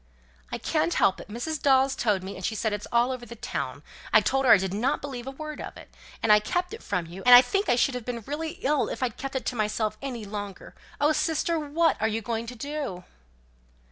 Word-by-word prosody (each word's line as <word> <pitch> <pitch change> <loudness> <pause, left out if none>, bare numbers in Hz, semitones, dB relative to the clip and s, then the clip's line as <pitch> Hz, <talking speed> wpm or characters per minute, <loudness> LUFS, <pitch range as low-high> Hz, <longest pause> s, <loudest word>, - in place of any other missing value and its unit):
"I - - -2
can't 165 +2 0
help 190 - +3
it. - - -12
Mrs. 245 +8 -4
Dawes 270 -1 +4
told 205 -7 +1
me; 195 +1 -6
and 190 - -9
she 220 - -1
says 220 0 -1
it's 205 0 -4
all 240 +2 +3
over 255 -2 -5
the 235 0 -9
town. - - -4 0.3
I - - +8
told 270 0 +1
her 245 - +6
I - - +10
did 190 0 -2
not 245 +8 0
believe 265 -3 -6
a - - -2
word 305 +2 -7
of - - -8
it. - - -14 0.3
And 220 - +4
I 210 - +7
kept 355 - -2
it 450 - -8
from 180 -4 -2
you; 175 +3 -9
and 250 0 +10
I 245 - +10
think 395 +10 -1
I - - +5
should 250 +2 +2
have 250 -1 -4
been 235 0 -4
really 315 +3 -3
ill 295 +1 +2
if - - -4
I'd 240 -4 -1
kept 270 0 -5
it 265 - -2
to 255 - -2
myself 215 0 -1
any 250 -6 -5
longer. 205 -1 -7 0.3
Oh, 295 +2 +4
sister! 325 +1 0
what 310 0 +1
are 220 - +3
you 225 0 -2
going 230 +1 -3
to 245 - -7
do?" 280 -8 -5
245 Hz, 250 wpm, -27 LUFS, 215-285 Hz, 0.3 s, I